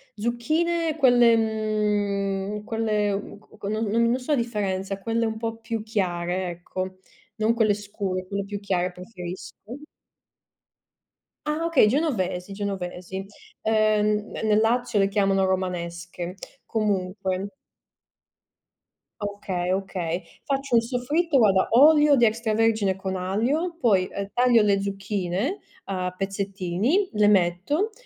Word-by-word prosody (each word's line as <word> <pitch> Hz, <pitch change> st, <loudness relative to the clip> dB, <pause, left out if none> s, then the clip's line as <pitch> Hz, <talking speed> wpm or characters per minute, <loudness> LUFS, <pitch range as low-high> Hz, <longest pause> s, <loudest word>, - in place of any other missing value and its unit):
zucchine 310 Hz, +9 st, 0 dB
quelle 245 Hz, -4 st, +6 dB
mhmm, 210 Hz, -2 st, -1 dB
quelle 210 Hz, -2 st, 0 dB
mhmm, 200 Hz, -, -6 dB, 0.2 s
q 200 Hz, -, -5 dB
non 215 Hz, +2 st, -1 dB
non 230 Hz, +4 st, +2 dB
so 255 Hz, +4 st, -4 dB
la 290 Hz, -, +4 dB
differenza, 200 Hz, -5 st, -2 dB
quelle 230 Hz, +2 st, 0 dB
un 220 Hz, -, -3 dB
po' 225 Hz, 0 st, -3 dB
più 225 Hz, -1 st, -4 dB
chiare, 180 Hz, -4 st, -1 dB
ecco, 185 Hz, +2 st, -5 dB, 0.4 s
non 220 Hz, +1 st, +2 dB
quelle 220 Hz, -3 st, +3 dB
scure, 200 Hz, -2 st, -4 dB
quelle 200 Hz, +1 st, -3 dB
più 205 Hz, 0 st, -5 dB
chiare 185 Hz, -3 st, -1 dB
preferisco. 185 Hz, +5 st, -9 dB, 1.7 s
Ah 305 Hz, +2 st, -1 dB
okay, 330 Hz, -10 st, +5 dB
genovesi, 200 Hz, -, -1 dB
genovesi. 190 Hz, -2 st, -4 dB, 0.5 s
Uhm, 215 Hz, -1 st, +2 dB
ne -, -, -5 dB
nel 215 Hz, -1 st, +3 dB
Lazio 230 Hz, -1 st, +1 dB
le 195 Hz, -, +4 dB
chiamano 195 Hz, -1 st, +2 dB
romanesche, 175 Hz, -1 st, -3 dB, 0.3 s
comunque 195 Hz, -2 st, -1 dB, 1.7 s
Okay, 195 Hz, -3 st, -3 dB
okay. 185 Hz, -2 st, -2 dB, 0.2 s
Faccio 275 Hz, -2 st, -2 dB
un 230 Hz, -, +6 dB
soffritto, 275 Hz, +6 st, 0 dB
guarda, 195 Hz, -5 st, +4 dB
olio 295 Hz, +3 st, +7 dB
di 240 Hz, -, +5 dB
extravergine 220 Hz, -3 st, +1 dB
con 190 Hz, 0 st, -4 dB
aglio, 245 Hz, -, -1 dB
poi, 195 Hz, -6 st, +3 dB
uhm, 200 Hz, 0 st, -4 dB
taglio 245 Hz, -2 st, +4 dB
le 200 Hz, -1 st, +2 dB
zucchine 195 Hz, -, -2 dB, 0.3 s
a 185 Hz, -2 st, -2 dB
pezzettini, 195 Hz, -, 0 dB
le 210 Hz, -1 st, +4 dB
metto, 200 Hz, -, +2 dB
210 Hz, 120 wpm, -25 LUFS, 190-230 Hz, 1.7 s, olio